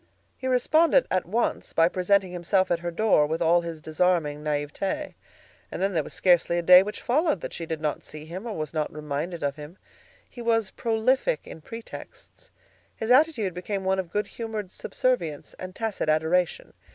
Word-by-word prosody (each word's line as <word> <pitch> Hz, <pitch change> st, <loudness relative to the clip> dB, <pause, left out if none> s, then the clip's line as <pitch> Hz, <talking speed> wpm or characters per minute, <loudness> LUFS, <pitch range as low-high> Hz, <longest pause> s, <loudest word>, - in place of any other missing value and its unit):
He 260 Hz, -, -5 dB
responded 315 Hz, -, +4 dB
at 185 Hz, -2 st, 0 dB
once 225 Hz, +6 st, -1 dB
by 165 Hz, 0 st, +5 dB
presenting 185 Hz, +1 st, +1 dB
himself 180 Hz, +2 st, +1 dB
at 170 Hz, -, +2 dB
her 175 Hz, 0 st, -3 dB
home 200 Hz, -9 st, +4 dB
with 160 Hz, +1 st, -1 dB
all 170 Hz, +1 st, +4 dB
his 165 Hz, -2 st, -7 dB
disarming 155 Hz, -2 st, 0 dB
naïveté. 155 Hz, -, -2 dB, 0.6 s
And -, -, -5 dB
then 195 Hz, +1 st, 0 dB
there 165 Hz, -, +2 dB
was -, -, -9 dB
scarcely 175 Hz, -1 st, +3 dB
a 175 Hz, -, -1 dB
day 180 Hz, +1 st, +9 dB
which 210 Hz, +2 st, -6 dB
followed 275 Hz, -, +1 dB
that -, -, -6 dB
she 165 Hz, -, -6 dB
did 160 Hz, -1 st, -3 dB
not 150 Hz, -1 st, -2 dB
see 155 Hz, 0 st, -10 dB
him 185 Hz, +8 st, -7 dB
or 220 Hz, -, -4 dB
was 155 Hz, -1 st, -4 dB
not 155 Hz, -2 st, -1 dB
reminded 150 Hz, +3 st, -4 dB
of 140 Hz, 0 st, -1 dB
him. 150 Hz, +5 st, -10 dB, 0.5 s
He 245 Hz, -, -10 dB
was 225 Hz, -4 st, +1 dB
prolific 255 Hz, -, +1 dB
in 160 Hz, -, -10 dB
pretexts. 230 Hz, -, -11 dB, 0.5 s
His 225 Hz, +2 st, -2 dB
attitude 255 Hz, -, +3 dB
became 190 Hz, +3 st, -4 dB
one 190 Hz, 0 st, +1 dB
of 180 Hz, -3 st, -3 dB
good 210 Hz, +4 st, -1 dB
humored 220 Hz, -4 st, -6 dB
subservience 175 Hz, -, -2 dB
and 185 Hz, 0 st, -7 dB
tacit 220 Hz, -8 st, -2 dB
adoration. 160 Hz, +3 st, +1 dB
180 Hz, 185 wpm, -26 LUFS, 160-225 Hz, 0.6 s, day